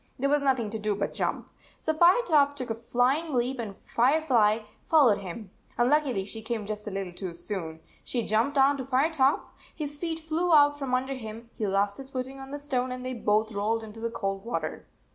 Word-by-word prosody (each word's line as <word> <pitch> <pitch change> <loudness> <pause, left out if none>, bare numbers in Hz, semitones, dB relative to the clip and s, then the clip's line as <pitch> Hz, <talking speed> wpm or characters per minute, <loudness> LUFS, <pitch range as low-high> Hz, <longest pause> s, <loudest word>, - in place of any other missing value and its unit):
There 275 +2 0
was 295 0 +3
nothing 255 -6 +1
to 220 - -4
do 210 -1 0
but 200 - -2
jump. - - -2 0.3
So 315 - -1
Firetop 315 -4 +4
took 255 -4 -4
a - - +2
flying 255 +7 0
leap, 250 +2 0
and 205 -4 -5
Firefly 240 -5 +2 0.2
followed 270 -11 +5
him. 190 +1 -8 0.3
Unluckily 250 -5 +2
she 220 +2 -6
came 220 -1 -3
just 210 +1 -5
a - - -1
little 195 -2 -4
too 180 -2 -6
soon. 165 -4 -5 0.2
She 240 -2 -1
jumped 230 +8 +1
on 275 +1 +5
to 265 - -4
Firetop. 270 +2 +1 0.2
His 290 -2 -4
feet 325 -1 -2
flew 325 +2 +1
out 290 -1 +6
from 265 -3 0
under 265 +2 -1
him, 230 -2 -8
he 215 - -2
lost 200 +1 +1
his 270 -1 -9
footing 265 +1 -5
on 270 0 -9
the 290 - -4
stone, 255 -3 -1
and 255 0 -5
they 255 - -2
both 215 -1 +1
rolled 220 +2 -1
into 220 0 -10
the 230 +1 -2
cold 195 -3 -3
water. 235 +1 -4
245 Hz, 205 wpm, -28 LUFS, 215-280 Hz, 0.3 s, out